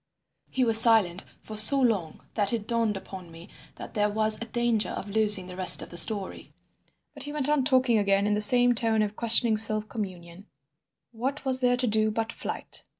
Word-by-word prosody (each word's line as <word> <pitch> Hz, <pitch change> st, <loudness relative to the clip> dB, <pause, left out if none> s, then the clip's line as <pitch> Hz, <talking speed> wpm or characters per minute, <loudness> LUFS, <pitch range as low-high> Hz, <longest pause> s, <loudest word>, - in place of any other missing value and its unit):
He 260 Hz, -, -3 dB
was 225 Hz, -1 st, +2 dB
silent 205 Hz, -6 st, +1 dB, 0.2 s
for 215 Hz, -, -11 dB
so 215 Hz, +6 st, +6 dB
long 205 Hz, -, -3 dB
that 205 Hz, -2 st, -3 dB
it 225 Hz, -3 st, -6 dB
dawned 230 Hz, -3 st, -3 dB
upon 190 Hz, -2 st, -12 dB
me 165 Hz, +1 st, -16 dB, 0.3 s
that -, -, -12 dB
there 210 Hz, -1 st, -2 dB
was 215 Hz, +1 st, +1 dB
a -, -, -6 dB
danger 235 Hz, -1 st, -2 dB
of 200 Hz, -, -9 dB
losing 210 Hz, -3 st, +1 dB
the 180 Hz, 0 st, -12 dB
rest 185 Hz, -1 st, +5 dB
of -, -, -13 dB
the -, -, -11 dB
story. 200 Hz, +1 st, +1 dB, 0.6 s
But -, -, -11 dB
he 290 Hz, -, -7 dB
went 295 Hz, -2 st, -5 dB
on 295 Hz, -2 st, -1 dB
talking 255 Hz, -4 st, 0 dB
again 200 Hz, 0 st, -1 dB
in 210 Hz, -, -2 dB
the 210 Hz, -, -2 dB
same 245 Hz, +3 st, +4 dB
tone 225 Hz, -2 st, 0 dB
of 210 Hz, 0 st, -7 dB
questioning 230 Hz, -1 st, +2 dB
self 215 Hz, 0 st, +4 dB
communion. 185 Hz, -3 st, -10 dB, 0.6 s
"What 265 Hz, +5 st, -7 dB
was 260 Hz, -1 st, +2 dB
there 245 Hz, -1 st, -1 dB
to 250 Hz, -, +2 dB
do 215 Hz, -1 st, 0 dB
but 225 Hz, +1 st, -5 dB
flight? -, -, -6 dB
220 Hz, 205 wpm, -24 LUFS, 200-240 Hz, 0.6 s, so